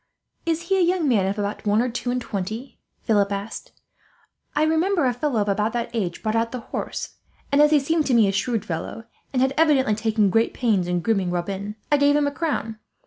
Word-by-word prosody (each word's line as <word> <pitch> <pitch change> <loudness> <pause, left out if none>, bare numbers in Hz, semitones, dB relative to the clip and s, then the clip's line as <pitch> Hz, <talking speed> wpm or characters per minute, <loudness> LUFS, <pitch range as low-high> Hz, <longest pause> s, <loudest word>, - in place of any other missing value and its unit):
"Is 330 0 0
he 385 +2 +1
a - - +4
young 350 -2 +1
man 205 -7 +3
of 195 +2 -2
about 205 +1 -3
one 205 +1 +3
or 245 - +2
two 245 0 -3
and 250 +1 0
twenty?" 220 +3 -5 0.2
Philip 205 -3 +2
asked. 200 +2 -5 0.8
"I 300 - +3
remember 320 +1 +2
a 250 - +2
fellow 245 -1 -1
of 205 - -1
about 210 +2 0
that 235 0 -2
age 185 -7 -3
brought 215 0 0
out 230 0 +1
the 250 - -4
horse, - - -4 0.3
and 280 +1 +5
as 300 - +6
he 300 -1 +5
seemed 310 +3 0
to 255 - +3
me 220 -3 +5
a - - +2
shrewd 220 +2 -1
fellow, 170 +7 -5 0.3
and 255 -1 +2
had 265 +1 +1
evidently 290 -8 +4
taken 215 -2 +1
great 225 +3 +2
pains 210 -8 +1
in 180 0 0
grooming 195 -3 +1
Robin, 195 +4 -3 0.2
I 295 - +5
gave 285 0 +4
him 295 0 +3
a 285 - 0
crown. 280 -9 -3
230 Hz, 225 wpm, -23 LUFS, 205-285 Hz, 0.8 s, as